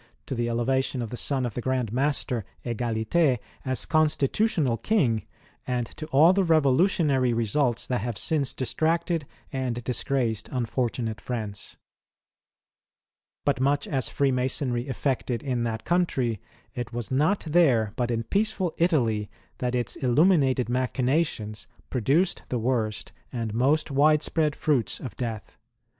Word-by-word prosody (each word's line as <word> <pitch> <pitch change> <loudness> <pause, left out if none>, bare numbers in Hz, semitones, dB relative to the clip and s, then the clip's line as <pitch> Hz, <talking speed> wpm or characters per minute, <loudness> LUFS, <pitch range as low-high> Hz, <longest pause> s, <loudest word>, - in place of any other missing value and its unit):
to - - -4
the 120 -1 -1
elevation 130 +3 0
of 115 -3 -4
the - - -4
son 130 +1 0
of 120 - -3
the 125 - -3
Grand 125 -3 -1
Master, 130 -3 0 0.2
Egalite, 120 +5 +1 0.3
as 130 -1 -1
Constitutional 155 - +2
King, 115 - +1 0.4
and 125 -2 0
to 155 - -6
all 155 +5 +6
the 195 0 +2
revolutionary 150 - +3
results 120 +2 +1
that 125 -4 -1
have 115 -2 -3
since 145 +3 0
distracted 165 +3 0 0.3
and 125 -3 -2
disgraced 120 -3 -1
unfortunate 120 -2 -2
France. 110 -5 -5 1.7
But 140 -3 +2
much 140 +1 +1
as 135 -2 -1
Freemasonry 130 -2 0
effected 130 -2 -2
in 125 -4 -1
that 110 -1 -3
country, 130 - 0 0.3
it 120 -2 -5
was 120 0 -5
not 155 +10 +2
there 135 -10 +3
but 120 -1 -1
in 115 -1 -1
peaceful 195 - 0
Italy 115 - +2 0.3
that 125 0 -1
its 120 -1 -1
illuminated 135 -1 +3
machinations 125 -4 -1 0.2
produced 140 - +1
the 125 - -1
worst 115 -3 -1 0.2
and 115 -4 -3
most 140 +7 +2
wide 150 +2 +4
spread 155 -2 +1
fruits 140 -7 0
of 125 - -7
death. 115 -4 -5
130 Hz, 135 wpm, -26 LUFS, 120-150 Hz, 1.7 s, all